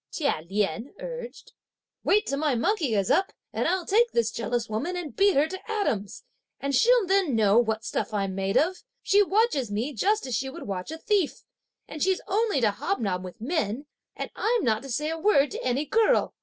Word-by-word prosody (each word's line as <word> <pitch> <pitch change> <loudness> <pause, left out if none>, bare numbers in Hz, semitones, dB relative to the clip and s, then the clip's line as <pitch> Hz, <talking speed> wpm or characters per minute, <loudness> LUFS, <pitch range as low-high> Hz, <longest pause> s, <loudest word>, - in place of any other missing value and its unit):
Chia 280 - -1
Lien 210 - -2
urged; - - -8 0.5
"wait 420 +2 +3
till 275 - -2
my 295 -4 +1
monkey 280 - +1
is 195 -2 +1
up, 385 +3 +2 0.2
and - - 0
I'll 370 -2 0
take 465 +6 +3
this 230 -2 +1
jealous 235 0 -2
woman, 230 +12 -3
and 330 -5 -6
beat 400 0 +4
her 290 +3 +4
to 375 +5 -7
atoms; 230 - -2 0.4
and 280 0 -2
she'll 475 - +4
then 375 -8 +2
know 215 0 +4
what 220 -1 -1
stuff - - -2
I'm 195 -2 -1
made 195 +1 0
of. 360 +5 +2 0.3
She 405 +1 +4
watches 400 - +2
me 230 +8 -2
just 415 - +1
as 255 - -4
she 265 +5 -1
would - - -8
watch 190 +1 -4
a 320 - -5
thief! 385 -2 0 0.4
and 305 - -8
she's 380 0 +2
only 420 -5 +1
to 215 -3 +3
hobnob 200 - -2
with 185 +5 -10
men, 260 - -2 0.3
and - - -5
I'm 465 0 +1
not 220 -2 +1
to 275 - -9
say 300 +6 -1
a 325 - -4
word 295 -7 +3
to - - -5
any 255 +4 0
girl! 450 +7 +2
285 Hz, 205 wpm, -26 LUFS, -, 0.5 s, beat